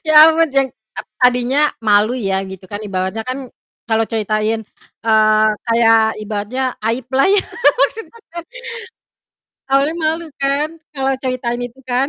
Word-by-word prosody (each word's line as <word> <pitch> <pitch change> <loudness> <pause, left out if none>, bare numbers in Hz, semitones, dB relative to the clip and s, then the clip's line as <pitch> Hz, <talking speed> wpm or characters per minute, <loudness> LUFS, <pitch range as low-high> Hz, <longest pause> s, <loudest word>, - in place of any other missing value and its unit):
Ya - - +3 0.2
ampun, 325 0 +3
jeng 270 -1 +3 0.3
ak - - -5 0.2
tadinya 250 +2 +3 0.3
malu 210 +3 +4 0.2
ya, 190 - +1
gitu 190 0 -10
kan, 205 - -4
ibaratnya 190 +3 -3
kan 255 +2 -2 0.5
kalau 225 0 +2
ceritain, 215 +1 0 0.4
eee, 215 -1 +4 0.2
kayak 230 -1 +4 0.2
ibaratnya 210 +5 -3 0.3
aib 235 +1 -2
lah 270 - +4
ya, 410 - +3 0.4
maksudnya 455 +1 -1
kan. 340 0 -6 1.3
Awalnya 280 +4 +2
malu 325 +2 0 0.2
kan, 280 +2 +1 0.3
kalau 270 0 0
ceritain 245 -2 -2
itu 245 +2 -17
kan. 260 +3 +1
240 Hz, 140 wpm, -17 LUFS, 215-275 Hz, 1.3 s, malu